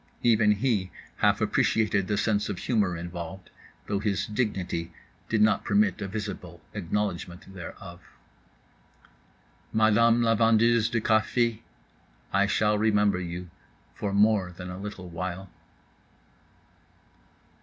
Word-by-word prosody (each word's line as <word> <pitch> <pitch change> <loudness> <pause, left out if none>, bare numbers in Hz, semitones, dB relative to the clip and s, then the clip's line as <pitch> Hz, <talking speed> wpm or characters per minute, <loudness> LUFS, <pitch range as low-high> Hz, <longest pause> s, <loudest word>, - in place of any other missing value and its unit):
Even 110 -3 +4
he 105 -4 0 0.3
half - - +2
appreciated 105 -3 +1
the 105 - 0
sense 105 0 0
of 100 - -3
humor 100 -7 0
involved; 85 +2 -7 0.3
though 100 -1 -1
his 105 -2 -1
dignity 95 -7 -2 0.4
did 110 -1 +3
not 110 - +3
permit 205 0 +2
a 100 - -2
visible 100 -4 -6
acknowledgment 95 -2 -3
thereof. 90 0 -9 1.7
Madame 115 +2 +4
la 115 -1 +3
vendeuse 115 +1 +3
de 115 - 0
café, 110 +1 +1 0.7
I 100 +1 +3
shall 105 0 +2
remember 105 -3 +2
you 90 0 -6 0.4
for 100 - -3
more 100 -2 +3
than 90 +1 -8
a 90 - -7
little 100 -2 -7
while. 90 +2 -5
105 Hz, 115 wpm, -27 LUFS, 90-110 Hz, 1.7 s, Even